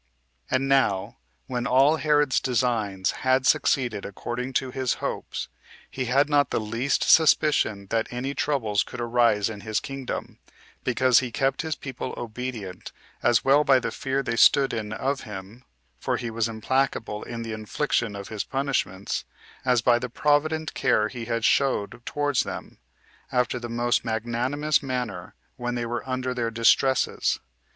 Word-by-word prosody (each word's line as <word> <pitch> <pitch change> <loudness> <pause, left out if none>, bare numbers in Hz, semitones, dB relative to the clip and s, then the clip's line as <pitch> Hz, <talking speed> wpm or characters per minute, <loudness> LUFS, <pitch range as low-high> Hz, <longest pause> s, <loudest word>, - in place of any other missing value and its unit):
5. - - +1
And 135 +1 +1
now, 130 -9 +1 0.3
when 125 -1 -2
all 135 +5 +4
Herod's 145 -3 +2
designs 110 -6 0
had 130 0 +2
succeeded 125 -6 +2
according 120 +6 -5
to 130 0 0
his 130 -1 -1
hopes, - - -4 0.4
he 130 - -3
had 135 +4 +3
not 145 -1 +3
the - - 0
least 115 +5 0
suspicion 150 -10 +4
that 115 -1 +1
any 130 +3 -3
troubles 115 -10 0
could - - -6
arise 120 -3 +2
in 105 -3 -7
his 110 +1 -1
kingdom, 135 -2 -6 0.4
because 125 0 +4
he 125 -3 -4
kept 135 +2 0
his 160 -1 -2
people 130 -2 -6
obedient, 115 -5 -6 0.3
as 120 - +3
well 140 +2 +5
by 135 -2 +5
the - - -3
fear 135 0 -2
they 115 - -2
stood 135 +4 +5
in 105 -2 -3
of 135 +5 -2
him, 105 +2 -9 0.4
for - - -1
he 120 -2 -4
was 115 0 0
implacable 115 -2 -1
in 115 -1 -6
the 115 -1 -5
infliction 110 0 -1
of 100 -1 -7
his 110 -2 -3
punishments, 135 -9 -2 0.4
as 125 -3 +2
by 120 -1 +4
the 125 0 -4
provident 150 +4 +1
care 105 0 +2
he 120 -1 -6
had 115 -1 -1
showed 125 -6 +1
towards 145 -3 +1
them, - - -7 0.5
after 125 0 +1
the 120 0 -6
most 120 +1 +1
magnanimous 120 +7 0
manner, 125 -10 -4 0.2
when 120 -1 -3
they 120 -1 -2
were 120 0 -3
under 130 0 -1
their 120 -2 -1
distresses. 115 +4 +2
125 Hz, 160 wpm, -25 LUFS, 115-135 Hz, 0.5 s, well